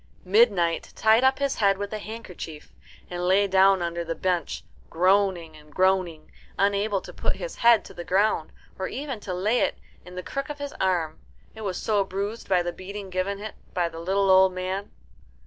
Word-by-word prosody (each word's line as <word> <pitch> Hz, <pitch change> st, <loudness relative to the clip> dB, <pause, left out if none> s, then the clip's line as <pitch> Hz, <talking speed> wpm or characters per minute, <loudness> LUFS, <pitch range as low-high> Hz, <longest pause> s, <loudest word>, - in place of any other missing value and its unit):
Midnight 185 Hz, -5 st, +3 dB
tied 220 Hz, +3 st, +4 dB
up 265 Hz, 0 st, +4 dB
his 280 Hz, -1 st, -1 dB
head 200 Hz, -2 st, +3 dB
with 205 Hz, +1 st, -5 dB
a 215 Hz, -, -3 dB
handkerchief, 190 Hz, -8 st, -8 dB, 0.3 s
and 180 Hz, 0 st, -3 dB
lay 195 Hz, +2 st, +4 dB
down 190 Hz, -1 st, +4 dB
under 170 Hz, 0 st, -2 dB
the 165 Hz, 0 st, -4 dB
bench, 180 Hz, -2 st, -1 dB, 0.3 s
groaning 180 Hz, -2 st, +2 dB
and 150 Hz, 0 st, -16 dB
groaning, 185 Hz, -3 st, +1 dB, 0.3 s
unable 200 Hz, 0 st, +1 dB
to -, -, -11 dB
put -, -, -1 dB
his -, -, -6 dB
head 235 Hz, -2 st, +5 dB
to -, -, -11 dB
the 175 Hz, -, -7 dB
ground, 190 Hz, -3 st, +1 dB, 0.3 s
or 190 Hz, -, -1 dB
even 270 Hz, -4 st, -5 dB
to 200 Hz, -, -6 dB
lay 205 Hz, +7 st, +1 dB
it -, -, 0 dB, 0.3 s
in 180 Hz, +1 st, -12 dB
the 180 Hz, -, -5 dB
crook 275 Hz, +7 st, -4 dB
of 295 Hz, -, -5 dB
his 285 Hz, 0 st, -6 dB
arm, 175 Hz, -5 st, 0 dB, 0.3 s
it 220 Hz, -, -10 dB
was 195 Hz, -4 st, -3 dB
so 210 Hz, -2 st, +1 dB
bruised 200 Hz, +4 st, -5 dB
by 180 Hz, -2 st, +3 dB
the 175 Hz, 0 st, -3 dB
beating 195 Hz, +1 st, -8 dB
given 185 Hz, +2 st, -1 dB
it 210 Hz, +1 st, -7 dB, 0.2 s
by 175 Hz, -1 st, +2 dB
the 165 Hz, -1 st, -8 dB
little 195 Hz, +3 st, +2 dB
old 190 Hz, 0 st, +6 dB
man. 185 Hz, +2 st, -3 dB
190 Hz, 195 wpm, -25 LUFS, 180-210 Hz, 0.3 s, old